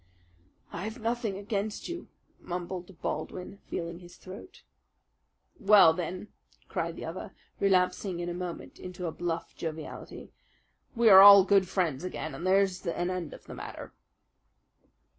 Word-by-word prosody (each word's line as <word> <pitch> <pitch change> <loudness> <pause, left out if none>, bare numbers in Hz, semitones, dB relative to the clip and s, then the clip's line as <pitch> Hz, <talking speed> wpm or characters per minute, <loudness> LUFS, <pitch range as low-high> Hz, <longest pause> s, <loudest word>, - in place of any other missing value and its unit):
"I 170 - -5
have 220 +4 -6
nothing 230 -3 -2
against 205 +1 -3
you," 345 0 -6 0.3
mumbled 180 0 -6
Baldwin, 185 +2 -5
feeling 170 0 -5
his 175 -1 -14
throat. 200 - -12 1.0
"Well, 200 -5 +7
then," 180 +4 -5 0.4
cried - - -3
the - - -7
other, - - -7 0.2
relapsing 185 -1 +1
in 175 - -3
a 175 - -3
moment 180 -1 -7
into 180 0 -7
a 165 - -2
bluff 170 0 -4
joviality, 160 -1 -7 0.6
"we 235 0 +3
are 190 -1 +10
all 200 -1 +10
good 195 -1 +3
friends 170 -6 -1
again 160 -4 -5
and 170 +7 -5
there's 190 -1 +2
an 175 +1 -1
end 180 -4 -4
of - - -16
the - - -9
matter." - - -9
185 Hz, 140 wpm, -29 LUFS, 175-200 Hz, 1.0 s, are